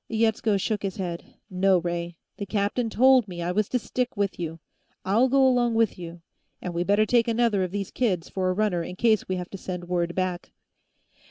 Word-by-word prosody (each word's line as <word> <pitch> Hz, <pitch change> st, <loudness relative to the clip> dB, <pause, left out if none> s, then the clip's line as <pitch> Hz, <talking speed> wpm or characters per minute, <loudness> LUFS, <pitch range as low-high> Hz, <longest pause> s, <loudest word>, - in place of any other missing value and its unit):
Yetsko 220 Hz, -1 st, +1 dB
shook 205 Hz, +1 st, -1 dB
his 195 Hz, -2 st, -4 dB
head. 175 Hz, -3 st, -6 dB
"No, 185 Hz, 0 st, +3 dB
Ray; 170 Hz, 0 st, -3 dB, 0.2 s
the 200 Hz, -, -5 dB
captain 210 Hz, +4 st, -1 dB
told 255 Hz, 0 st, +5 dB
me 175 Hz, -2 st, -6 dB
I 175 Hz, -, -1 dB
was 205 Hz, +2 st, 0 dB
to 250 Hz, -, +1 dB
stick 250 Hz, -1 st, -3 dB
with 200 Hz, -2 st, -1 dB
you. 165 Hz, -1 st, -5 dB, 0.5 s
I'll 225 Hz, +7 st, +3 dB
go 270 Hz, 0 st, +4 dB
along 240 Hz, -2 st, +2 dB
with 225 Hz, -4 st, +1 dB
you. 170 Hz, -1 st, -9 dB, 0.4 s
And 180 Hz, -, -5 dB
we 170 Hz, +1 st, 0 dB
better 205 Hz, +3 st, +3 dB
take 235 Hz, +1 st, +2 dB
another 230 Hz, -3 st, +2 dB
of 185 Hz, -, -2 dB
these 195 Hz, 0 st, -4 dB
kids, 190 Hz, -10 st, -1 dB
for 185 Hz, -1 st, -1 dB
a -, -, +1 dB
runner, 195 Hz, -3 st, 0 dB
in 180 Hz, +2 st, -6 dB
case 220 Hz, +1 st, +2 dB
we 185 Hz, -, -1 dB
have 180 Hz, -1 st, -6 dB
to 195 Hz, -, -7 dB
send 180 Hz, -1 st, -6 dB
word 175 Hz, -1 st, -1 dB
back." 185 Hz, -1 st, -3 dB
195 Hz, 210 wpm, -25 LUFS, 180-225 Hz, 0.5 s, told